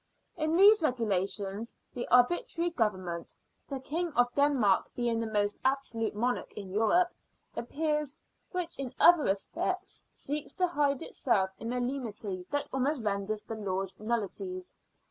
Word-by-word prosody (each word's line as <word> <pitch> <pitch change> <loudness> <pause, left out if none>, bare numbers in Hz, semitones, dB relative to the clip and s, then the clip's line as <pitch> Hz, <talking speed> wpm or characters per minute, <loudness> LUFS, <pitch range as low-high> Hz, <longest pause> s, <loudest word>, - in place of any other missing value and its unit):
In 315 -1 0
these 410 +4 +7
regulations 205 - -1 0.2
the 245 - -4
arbitrary 335 +7 +3
government 185 - -2 0.3
the 275 -2 -3
King 330 +6 -2
of 245 0 +3
Denmark 275 -9 +3
being 235 -2 0
the 230 -1 -2
most 205 -1 0
absolute 260 -5 0
monarch 245 +4 -1
in 195 -3 -7
Europe 225 - +3 0.5
appears, 300 +3 -1 0.3
which 355 -4 -3
in 260 -2 -4
other 345 -2 +8
respects 365 - -2
seeks 295 +1 -4
to 365 - +2
hide 290 -5 +1
itself 190 -7 +1
in 230 +1 -4
a 250 - -1
lenity 220 -8 -3
that 290 0 -1
almost 265 0 0
renders 210 +1 -1
the - - -6
laws 195 -3 -2
nullities. 235 - -3
245 Hz, 140 wpm, -30 LUFS, 210-300 Hz, 0.5 s, other